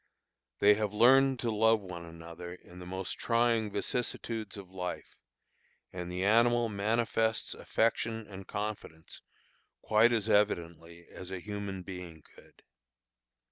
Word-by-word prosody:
They 105 +1 +6
have 105 -1 -2
learned 130 +4 +5
to 115 - 0
love 110 +1 +4
one 90 -4 -8
another 85 +1 -9
in 90 0 -15
the 90 - -9
most 95 0 -4
trying 115 -2 +2
vicissitudes 110 -2 -3
of 95 -2 -10
life, 90 -1 -6 0.8
and 90 -1 -5
the 90 +2 -2
animal 120 +2 +4
manifests 110 +2 0
affection 115 0 -1
and 95 -2 -10
confidence 100 -6 -6 0.6
quite 110 +2 +4
as 115 -3 0
evidently 85 -5 0
as 95 - -10
a 95 - -4
human 100 -1 -5
being 90 -4 -9
could. - - -20
100 Hz, 130 wpm, -31 LUFS, 90-115 Hz, 0.8 s, They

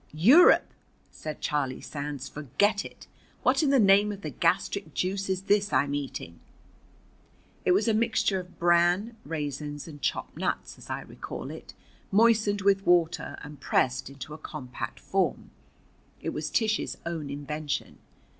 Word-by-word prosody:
"Europe!" 245 - +7 0.5
said 155 -1 -7
Charlie 135 -3 -1
Sands. 140 -2 -5
"Forget 205 - 0
it! - - -11 0.4
What - - +4
in 300 - +2
the 275 -1 +5
name 200 0 +5
of 200 -1 -7
the 155 - -4
gastric 165 +3 0
juice 195 +1 -1
is 190 0 -1
this 205 0 +2
I'm 140 0 +2
eating?" 135 - -5 1.3
It 180 - +5
was 205 +5 +2
a 225 - +3
mixture 215 -3 +1
of 180 0 -11
bran, 175 +6 +3
raisins, 145 -1 -4
and 145 -3 -10
chopped - - -2
nuts, - - -3
as - - -13
I - - -3
recall - - -7
it, - - -10 0.4
moistened 215 -1 +4
with 195 0 +3
water 175 -2 +2
and 150 -1 -10
pressed 130 0 +1
into 140 +2 -9
a 155 - -9
compact 130 -5 -6
form. - - -1 0.7
It - - -3
was 150 0 -3
Tish's 220 +2 0
own 165 -4 -4
invention. 145 +1 -4
170 Hz, 150 wpm, -28 LUFS, 145-200 Hz, 1.3 s, Europe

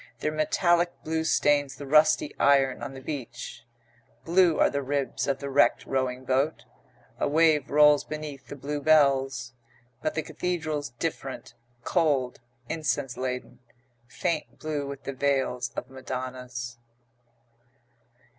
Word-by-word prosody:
Their 155 +5 -1
metallic 175 +3 +2
blue 160 0 -1
stains 145 -3 +2
the 145 - -8
rusty 150 +1 +4
iron 135 -2 +4
on 135 -1 -6
the 130 - -9
beach. 120 -6 -6 0.6
Blue 175 -1 +4
are - - +4
the 140 - -1
ribs 140 0 -2
of 140 -1 +1
the 140 - -6
wrecked 140 +1 +3
rowing 130 -1 -2
boat. 135 +4 0 0.5
A - - +1
wave 155 -1 +3
rolls 150 0 +6
beneath 150 -3 -7
the - - -7
blue 145 +2 -4
bells. 135 -5 +3 0.5
But 155 - -2
the 155 - -1
cathedral's 155 -1 -3
different, 135 0 -5 0.3
cold, 135 -6 +1 0.3
incense 145 -5 -2
laden, 125 -1 -4 0.5
faint 155 +4 -3
blue 150 -2 -3
with 140 0 -7
the 140 - -4
veils 130 -2 0
of 125 - -4
madonnas. 125 -2 -6
140 Hz, 130 wpm, -27 LUFS, 130-155 Hz, 0.6 s, rolls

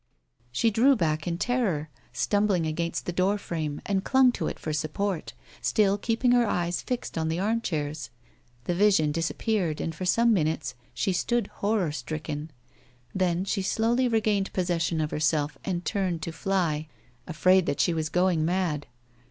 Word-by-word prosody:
She 225 - +2
drew 250 +6 +5
back 155 -6 -1
in 170 -1 -1
terror, 185 -10 0 0.2
stumbled 205 -5 +1
against 170 +2 -2
the - - -2
door 190 +4 +2
frame, 155 -6 -4
and 195 -1 0
clung 260 0 +5
to - - -3
it - - -4
for 155 - -4
support, 160 +4 -2 0.3
still 200 -2 +3
keeping 230 +3 +1
her 245 -2 +4
eyes 175 -2 -1
fixed 245 -9 -3
on 160 - 0
the 160 +1 -1
armchairs. 160 - -2 0.5
The 175 - -1
vision 185 -5 +3
disappeared 165 +1 -1
and 165 - -2
for 185 +3 -5
some 230 +5 +4
minutes 155 -7 0 0.2
she 190 - 0
stood 240 +6 0 0.2
horror 200 -6 +1
stricken; 150 +2 -5 0.6
then 185 -1 0
she 195 0 -1
slowly 230 +6 +1
regained 215 -4 +1
possession 175 -3 0
of 155 - -2
herself 150 -1 0
and 175 -2 -3
turned 185 -5 -1
to 165 - -3
fly, 165 -4 -1 0.4
afraid 185 +2 +3
that 140 - -1
she 175 - +3
was 160 -1 -1
lioing 180 -1 +2
mad. 160 -2 0
180 Hz, 160 wpm, -27 LUFS, 155-205 Hz, 0.6 s, drew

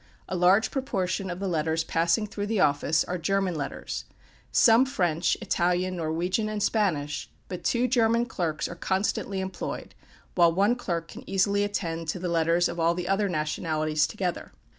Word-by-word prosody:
A 185 - -3
large 185 +5 +4
proportion 195 -8 -2
of 175 0 -5
the 195 - -2
letters 160 -1 0
passing 170 +7 +1
through 205 -1 -4
the 220 -1 0
office 150 +1 +3
are 180 0 -4
German 195 +2 0
letters 145 -4 -5 0.5
some 230 +1 +6
French, 175 - 0
Italian, 180 +1 0
Norwegian, 175 +6 -1
and 210 -1 -2
Spanish; 155 -10 0 0.2
but 180 - -6
two 245 +1 +2
German 235 -1 +3
clerks 170 -10 -2
are - - -7
constantly 190 +2 -1
employed, 190 0 -5 0.4
while 170 -2 +5
one 200 +7 +3
clerk 170 -9 -3
can - - -10
easily 200 +1 +2
attend 170 -5 -3
to 155 - -2
the 180 0 -3
letters 170 +1 +2
of 170 - -5
all 165 +1 +3
the 180 0 -4
other 195 +2 +2
different 175 -5 -1
nationalities 155 -1 0
together. 185 -5 -4
180 Hz, 170 wpm, -27 LUFS, 165-205 Hz, 0.5 s, some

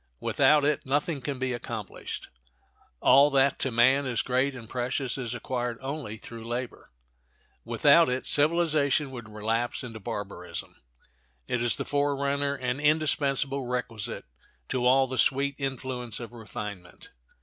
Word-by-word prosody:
Without 150 -1 +3
it 150 -1 +1
nothing 145 +2 -1
can 140 +1 -3
be 130 0 -1
accomplished. 115 -4 -6 0.7
All 140 +2 +6
that 135 0 +3
to 135 - 0
man 130 +4 +4
is 120 -3 0
great 130 +2 +1
and 115 -3 -9
precious 125 +1 -2
is 125 -3 -4
acquired 120 -1 -3
only 135 -5 -5
through 115 +1 -10
labor. 120 +2 -5 0.7
Without - - +5
it 125 +1 -2
civilization 150 -2 +3
would 120 -4 -8
relapse 110 +4 -2
into 115 -3 -7
barbarism. 95 -4 -6 0.7
It 125 - -1
is 120 -1 +4
the - - -4
forerunner 140 0 0
and 130 +1 -3
indispensable 140 -3 +1
requisite 115 - -3 0.4
to 125 -1 +1
all 135 +1 +5
the 130 0 -4
sweet 140 +1 +3
influence 130 -4 -3
of 120 -1 -8
refinement. 105 -5 -8
130 Hz, 140 wpm, -27 LUFS, 120-140 Hz, 0.7 s, All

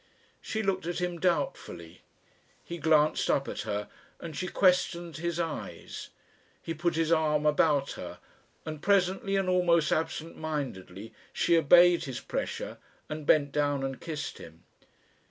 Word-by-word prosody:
She 220 0 -3
looked 190 -3 -1
at 175 - -2
him 175 -1 -2
doubtfully. 185 - -2 0.6
He 170 0 -7
glanced 155 -1 +3
up 140 - +2
at - - -4
her, 105 0 -2 0.3
and 165 -3 -7
she 185 +5 -3
questioned 175 -4 +1
his 170 +1 -2
eyes. 165 -2 -5 0.5
He 165 - -5
put 170 +1 -1
his 165 0 +1
arm 155 -2 +2
about 150 -2 +3
her, - - -7 0.5
and 155 -1 -6
presently 195 0 +2
and 195 -1 +1
almost 175 -3 +3
absent 160 0 -2
mindedly 115 - -5 0.2
she 170 - +2
obeyed 175 +2 +6
his 130 -3 -5
pressure - - -4 0.3
and 150 -1 -6
bent 145 -2 +4
down 145 -1 0
and 135 -1 -4
kissed 155 -3 -5
him. 80 0 -13
160 Hz, 145 wpm, -29 LUFS, 145-175 Hz, 0.6 s, obeyed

